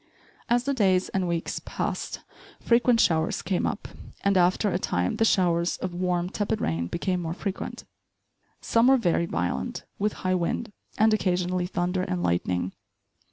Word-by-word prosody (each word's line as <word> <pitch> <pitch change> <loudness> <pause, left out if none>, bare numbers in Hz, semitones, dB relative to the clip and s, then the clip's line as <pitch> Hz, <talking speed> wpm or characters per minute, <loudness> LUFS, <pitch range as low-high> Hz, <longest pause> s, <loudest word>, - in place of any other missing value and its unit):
As 240 +1 +3
the 280 +2 0
days 190 -7 +2
and 190 -2 -1
weeks 170 -1 -2
passed, - - -3 0.4
frequent 235 0 +3
showers 160 -6 +2
came 185 -2 0
up; - - -4 0.4
and 200 0 +3
after 185 +3 +3
a 180 - 0
time, 90 - -1
the 225 - +3
showers 175 -4 +2
of 185 -1 -4
warm, 180 0 0
tepid 210 +2 -2
rain 85 +1 -1
became 180 - -1
more 165 0 -3
frequent. 195 0 -5 0.8
Some 230 +1 +3
were 270 0 +6
very 170 -6 +1
violent, 90 - -2 0.2
with 210 +1 +1
high 185 - +2
wind, 185 +5 -1 0.3
and 220 +1 +4
occasionally 180 -3 0
thunder 180 0 -1
and 180 -1 -2
lightning. 90 +1 0
180 Hz, 160 wpm, -26 LUFS, 170-205 Hz, 0.8 s, were